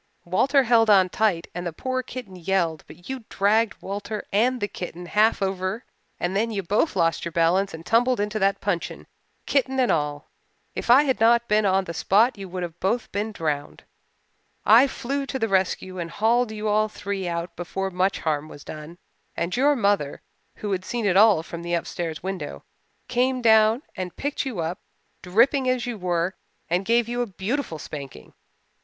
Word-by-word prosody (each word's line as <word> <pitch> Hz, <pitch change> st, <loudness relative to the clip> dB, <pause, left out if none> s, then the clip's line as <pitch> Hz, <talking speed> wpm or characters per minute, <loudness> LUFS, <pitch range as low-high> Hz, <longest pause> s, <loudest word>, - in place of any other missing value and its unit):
Walter 265 Hz, +11 st, +3 dB
held 230 Hz, -2 st, +4 dB
on 190 Hz, -3 st, +6 dB
tight 195 Hz, -5 st, +1 dB
and 175 Hz, -, -4 dB
the -, -, -3 dB
poor 255 Hz, +10 st, -2 dB
kitten 250 Hz, -6 st, -8 dB
yelled 175 Hz, -3 st, -1 dB
but 175 Hz, -, -14 dB
you 265 Hz, -2 st, -5 dB
dragged 210 Hz, +2 st, +2 dB
Walter 205 Hz, +2 st, -5 dB
and 245 Hz, +5 st, +2 dB
the 205 Hz, -, -1 dB
kitten 175 Hz, -2 st, -7 dB
half 210 Hz, +3 st, +2 dB
over 190 Hz, +3 st, -2 dB, 0.3 s
and 175 Hz, +2 st, -2 dB
then 225 Hz, +3 st, +1 dB
you 200 Hz, -3 st, -3 dB
both 210 Hz, -, +1 dB
lost 165 Hz, 0 st, +1 dB
your 170 Hz, -, -4 dB
balance 175 Hz, +4 st, +2 dB
and 160 Hz, +1 st, -9 dB
tumbled 245 Hz, +1 st, +3 dB
into 210 Hz, +1 st, -1 dB
that 195 Hz, 0 st, +1 dB
puncheon, 180 Hz, -4 st, -3 dB, 0.4 s
kitten 265 Hz, -1 st, +1 dB
and 250 Hz, -, +3 dB
all. 145 Hz, -2 st, -1 dB, 0.5 s
If -, -, -5 dB
I 260 Hz, +4 st, +8 dB
had 265 Hz, -3 st, 0 dB
not 235 Hz, +1 st, +4 dB
been 210 Hz, -1 st, +3 dB
on 190 Hz, 0 st, +2 dB
the 170 Hz, -, -6 dB
spot 215 Hz, +9 st, +3 dB
you 195 Hz, -2 st, -8 dB
would 180 Hz, 0 st, -4 dB, 0.2 s
both 230 Hz, +6 st, +1 dB
have -, -, -26 dB
been 210 Hz, +2 st, -2 dB
drowned. 150 Hz, -7 st, -3 dB, 0.8 s
I 230 Hz, +6 st, +7 dB
flew 275 Hz, +1 st, -3 dB
to 270 Hz, -, -3 dB
the 225 Hz, -, 0 dB
rescue 185 Hz, -1 st, 0 dB
and 170 Hz, -1 st, -4 dB
hauled 225 Hz, +5 st, +1 dB
you 215 Hz, 0 st, -4 dB
all 215 Hz, +1 st, +2 dB
three 200 Hz, -3 st, -4 dB
out 170 Hz, 0 st, -4 dB
before 190 Hz, +2 st, -4 dB
much 185 Hz, +2 st, 0 dB
harm 155 Hz, -1 st, -1 dB
was 145 Hz, -, -11 dB
done, 155 Hz, +3 st, -9 dB, 0.4 s
and 170 Hz, +1 st, -1 dB
your 285 Hz, +4 st, +4 dB
mother, 200 Hz, -, 0 dB, 0.3 s
who 210 Hz, -, -5 dB
had 185 Hz, -1 st, -1 dB
seen 235 Hz, +3 st, -3 dB
it 190 Hz, -3 st, +2 dB
all 205 Hz, -5 st, +6 dB
from 170 Hz, 0 st, -7 dB
the 175 Hz, 0 st, -1 dB
upstairs 170 Hz, -1 st, -4 dB
window, 180 Hz, -, -5 dB, 0.4 s
came 255 Hz, +1 st, +1 dB
down 220 Hz, +2 st, +4 dB
and 180 Hz, -1 st, -5 dB
picked 285 Hz, 0 st, -2 dB
you 220 Hz, -10 st, -3 dB
up, 165 Hz, +4 st, -3 dB, 0.4 s
dripping 250 Hz, +8 st, +3 dB
as 255 Hz, -1 st, 0 dB
you 245 Hz, -1 st, -3 dB
were, 180 Hz, -2 st, -1 dB, 0.4 s
and 180 Hz, +3 st, +1 dB
gave 235 Hz, +1 st, +3 dB
you 240 Hz, +1 st, -2 dB
a 240 Hz, -, -1 dB
beautiful 200 Hz, -, -3 dB
spanking. 140 Hz, -, -9 dB
200 Hz, 190 wpm, -24 LUFS, 175-235 Hz, 0.8 s, I